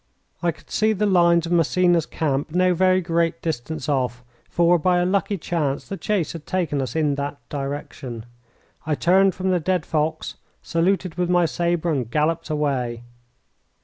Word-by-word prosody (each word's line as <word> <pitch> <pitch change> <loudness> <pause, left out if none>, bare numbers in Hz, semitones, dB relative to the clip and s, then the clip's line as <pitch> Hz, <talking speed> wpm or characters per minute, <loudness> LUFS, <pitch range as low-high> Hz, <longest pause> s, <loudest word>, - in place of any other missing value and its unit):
I 170 - +2
could 160 - -19
see 215 0 +2
the 210 +1 0
lines 170 -3 +4
of 165 - -5
Massena's 175 0 +3
camp 145 -2 -1
no 180 +3 +2
very 185 +1 +3
great 165 -1 0
distance 155 -1 -3
off, 125 -4 -1 0.3
for, 175 0 +3
by 180 +2 +2
a 175 - +2
lucky 200 +2 0
chance, 155 -5 -2
the 195 - -4
chase 195 -5 -1
had 165 -3 -9
taken 170 -6 -1
us 130 - -4
in 150 -3 +2
that 145 0 -4
direction. 135 -4 -5 0.6
I 155 -2 0
turned 190 +4 +3
from 190 0 -1
the 180 - +2
dead 180 0 0
fox, 155 0 -2 0.3
saluted 180 0 0
with 175 -1 +1
my 175 -1 +4
sabre, 170 0 0
and 130 -7 -1
galloped 155 +5 0
away. 130 -6 -1
165 Hz, 170 wpm, -23 LUFS, 150-180 Hz, 0.6 s, lines